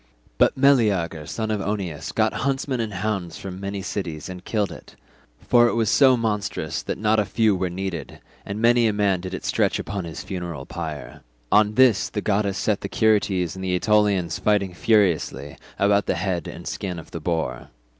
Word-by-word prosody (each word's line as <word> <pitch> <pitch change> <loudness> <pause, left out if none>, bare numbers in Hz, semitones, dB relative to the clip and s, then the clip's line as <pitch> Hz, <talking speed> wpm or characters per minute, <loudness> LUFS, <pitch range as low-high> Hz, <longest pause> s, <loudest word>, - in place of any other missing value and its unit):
But - - +4
Meleager 105 - +2
son 110 -1 -3
of 105 -2 -1
Oeneus 95 -7 -3
got - - +1
huntsmen 135 -1 -1
and 110 -2 -2
hounds 100 -3 -3
from 95 -1 -7
many 100 0 -4
cities 85 -7 -4
and 90 0 -8
killed 105 -1 -1
it—for 120 - -1
it - - 0
was 115 -1 +1
so 130 -3 +5
monstrous 105 -3 -2
that - - -4
not 110 +1 +2
a - - +3
few 110 -1 +2
were 90 0 -1
needed, 90 -1 -5 0.2
and 100 +2 -5
many 120 0 +4
a 110 - +1
man 100 -3 +1
did 95 +1 -5
it - - -7
stretch - - +1
upon 100 -3 -4
his 80 - -7
funeral 85 -7 -5
pyre. 80 -4 -7 0.3
On 105 0 +4
this 125 -6 +4
the 105 - -3
goddess 100 -1 0
set 105 -2 0
the - - -4
Curetes 100 -5 +2
and 95 - -7
the 90 -1 0
Aetolians 100 -4 +2
fighting 100 -3 +1
furiously 85 - +1 0.2
about 100 0 +2
the - - +1
head 90 -4 -2
and - - -8
skin 90 -3 -4
of 80 - -10
the 85 - -5
boar. 80 0 -3
100 Hz, 185 wpm, -23 LUFS, 90-110 Hz, 0.3 s, so